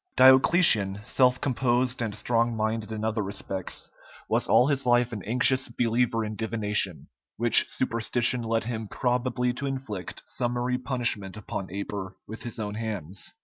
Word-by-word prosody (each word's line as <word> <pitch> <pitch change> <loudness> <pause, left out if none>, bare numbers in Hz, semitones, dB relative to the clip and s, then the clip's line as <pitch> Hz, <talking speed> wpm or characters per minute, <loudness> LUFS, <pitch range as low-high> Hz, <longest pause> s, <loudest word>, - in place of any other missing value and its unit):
Diocletian, 130 - +6
self 125 0 +2
composed 125 -1 0
and 110 -3 -3
strong 115 +1 0
minded 110 0 -2
in 110 0 -4
other 110 0 -1
respects, 95 -2 -4 0.4
was - - 0
all 125 - +5
his 140 -1 +1
life 120 -1 +2
an 105 - -5
anxious 130 +3 +3
believer 115 -1 0
in 105 0 -5
divination, 105 -5 -1 0.3
which 120 0 +5
superstition 120 0 +1
led 115 0 -1
him 110 -2 -5
probably 125 +1 -1
to 140 +3 -5
inflict 130 -9 -6
summary 125 +1 -2
punishment 120 -7 -2
upon 100 -2 -6
Aper 95 -1 -6
with 110 +2 -9
his 120 - -6
own 105 -2 -4
hands. 100 -5 -5
115 Hz, 145 wpm, -26 LUFS, 105-125 Hz, 0.4 s, Diocletian